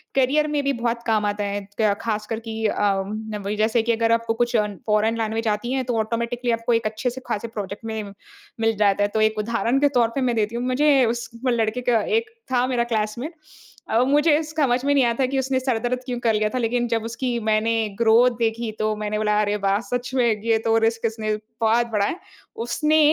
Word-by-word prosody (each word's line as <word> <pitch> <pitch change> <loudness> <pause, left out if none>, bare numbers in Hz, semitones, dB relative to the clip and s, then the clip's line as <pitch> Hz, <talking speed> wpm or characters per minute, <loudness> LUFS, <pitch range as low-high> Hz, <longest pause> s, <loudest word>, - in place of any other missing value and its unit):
Career 275 +3 +3
में 295 -1 0
भी 280 0 +1
बहुत 235 0 -2
काम 215 -2 +2
आता 205 0 -1
है। 205 0 -2 0.2
क 210 -2 +4
ख़ासकर 220 0 -2
कि 225 -1 -5
अ, 205 -1 +1 0.4
वही 205 +1 -3
जैसे 220 +2 +2
कि 235 - +1
अगर 230 0 +1
आपको 230 0 +1
कुछ 240 +1 0
फ़ॉरेन 210 +2 0
लैंग्वेज़ 225 0 -1
आती 215 +4 -2
है, 265 -1 0
तो 245 -2 -2
ऑटोमैटिकली 235 +2 -1
आपको 230 +1 0
एक 230 -1 +1
अच्छे 220 +3 -1
से 255 +2 -8
ख़ासे 215 +2 -2
प्रोजेक्ट 205 -1 -6
में 220 -1 -3 0.6
मिल 225 0 +2
जाता 205 -1 +3
है। - - +3
तो 220 - +1
एक 215 0 +2
उदाहरण 235 +4 0
के 290 - +4
तौर 235 -2 +4
पे 275 - 0
मैं 245 -2 +1
देती 220 +1 0
हूँ। 240 - -2
मुझे 270 +1 +4
उस 235 +1 -2 0.2
वो - - +3
लड़के 230 +1 0
का 240 -3 +2 0.2
एक 455 -1 -2 0.2
था 250 -1 +3
मेरा 245 -2 +1
क्लासमेट। 235 +6 -2 0.6
अ, 225 - +2
मुझे 295 +3 +3
स 310 - -9
समझ 255 -4 +2
में 285 - +3
नहीं 275 -2 +4
आया 235 -1 +2
था 265 - +4
कि 270 +1 -1
उसने 265 0 0
सर 255 -3 0
दर्द 250 +2 -1
क्यों 245 -2 -3
कर 230 -2 +2
लिया 215 0 +1
था? 255 - -4
लेकिन 240 +1 0
जब 230 -1 -1
उसकी 240 +1 -2
मैंने 215 +1 +2 0.3
ग्रोथ 235 +2 +5
देखी, 225 0 -1
तो 215 0 0
मैंने 210 0 -3
बोला, 210 0 +1
"अरे, 205 0 0
वाह! 195 +1 +3
सच 245 +1 -3
में, 250 -2 +3 0.2
ये 225 -1 +3
तो 225 0 +3
रिस्क 230 0 -1
इसने 220 -1 -1 0.3
बहुत 230 +2 +3
बड़ा 205 -2 +1
है। 330 - -2 0.5
उसने 305 +5 +2
230 Hz, 230 wpm, -23 LUFS, 215-250 Hz, 0.6 s, ग्रोथ